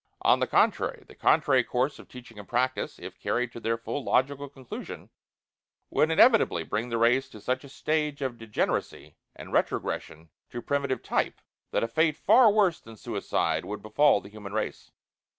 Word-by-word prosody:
On - - +5
the - - 0
contrary, - - +1
the - - -14
contrary 130 -3 +3
course 130 +5 -1
of - - -13
teaching 125 -4 -12
and 100 - -11
practice, 130 +2 -1
if - - -10
carried 125 0 -1
to 120 - -9
their 115 0 -1
full 130 +5 -5
logical 140 +3 0
conclusion, 135 -3 -9 0.8
would 155 - +3
inevitably 160 - +4
bring 115 +8 -3
the 115 - -1
race 125 +3 +3
to 110 - -12
such 130 +4 -2
a 140 - -12
stage 150 0 -1
of 125 -3 -4
degeneracy, 115 -2 -3 0.2
and - - -10
retrogression 80 0 -2 0.2
to 120 - -6
primitive 140 +1 -2
type, - - -1 0.3
that - - 0
a - - 0
fate 155 +5 +1
far 225 +2 +6
worse 200 -5 +2
than 115 0 -13
suicide - - -1
would 105 - -6
befall 110 +2 +3
the 100 - -12
human 105 -1 -10
race. 110 - -3
125 Hz, 175 wpm, -27 LUFS, 115-145 Hz, 0.8 s, far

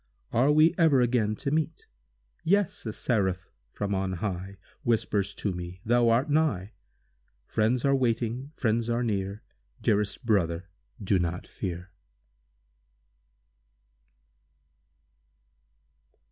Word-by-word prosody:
Are 130 +5 +4
we 155 +2 +5
e'er 160 -5 +5
again 120 -3 +2
to 140 +5 -3
meet? 160 +1 -1 0.6
Yes, 195 - +1
a - - -1
Seraph 95 -6 -1 0.2
from 100 +6 -2
on 95 -1 -1
high 95 +1 -4 0.2
Whispers 105 -6 0
to 100 - -2
me, 90 +1 -7
thou 120 +1 +4
art 120 +6 +3
nigh! 145 - +1 0.7
Friends 115 +4 +1
are 140 - +4
waiting—friends 120 -1 0
are 120 +1 +1
near— 100 -2 -2 0.4
Dearest 105 +3 0
brother—do 95 0 -1
not 90 +1 -2
fear! 90 -1 -6
110 Hz, 100 wpm, -28 LUFS, 95-125 Hz, 0.7 s, we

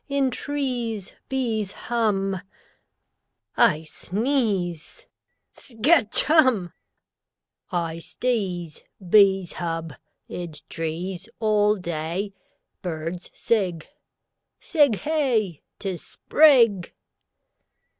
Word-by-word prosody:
In 275 -2 +1
trees 245 -9 -3 0.2
Bees 225 -7 -1
hum 195 -5 -1 1.1
I 175 -10 +4
sneeze 200 - -2 0.5
Skatch 245 -1 +2
Humb!! 260 - +3 1.0
I 165 -2 -2
sdeeze. 180 -6 -2 0.3
Bees 195 -2 +5
hub. 165 -3 -4 0.3
Id 170 -4 -7
trees 170 +3 -4
All 210 -1 +3
day 175 +2 -3 0.5
Birds 170 0 -5
sig. 185 -8 0 0.7
Sig 290 - +3
Hey! 245 - 0 0.2
'Tis 190 -5 -4
Sprig! 235 - +4
200 Hz, 75 wpm, -24 LUFS, 175-240 Hz, 1.1 s, Bees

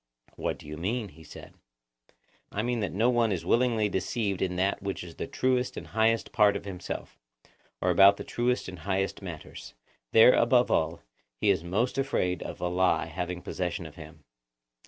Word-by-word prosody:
What - - -2
do - - -15
you 75 +1 -7
mean? 105 +6 -2
he 80 0 -16
said. - - -12 1.0
I 105 - -2
mean 120 0 -1
that 100 - -2
no 115 +6 +2
one 120 -3 +2
is 85 -3 -2
willingly 115 0 +2
deceived 100 0 -2
in 90 -1 0
that 95 +2 0
which 100 -2 -4
is 85 -2 -11
the - - -4
truest 130 -1 0
and - - -6
highest 110 +1 +1
part 105 -2 +4
of - - -5
himself, 95 -3 -6 0.6
or - - +2
about 100 0 +7
the - - -6
truest 125 +1 -1
and 90 -2 -8
highest 95 +3 -2
matters; 85 -9 -9 0.4
there, 115 +3 +8
above 120 +1 +3
all, 80 +1 0 0.3
he - - +2
is 80 - 0
most 110 +10 -1
afraid 90 -10 0
of - - -7
a 90 - -1
lie 90 -2 +2
having 90 +2 -5
possession 90 0 -3
of 80 - -9
him. 80 -2 -12
95 Hz, 185 wpm, -28 LUFS, 90-115 Hz, 1.0 s, there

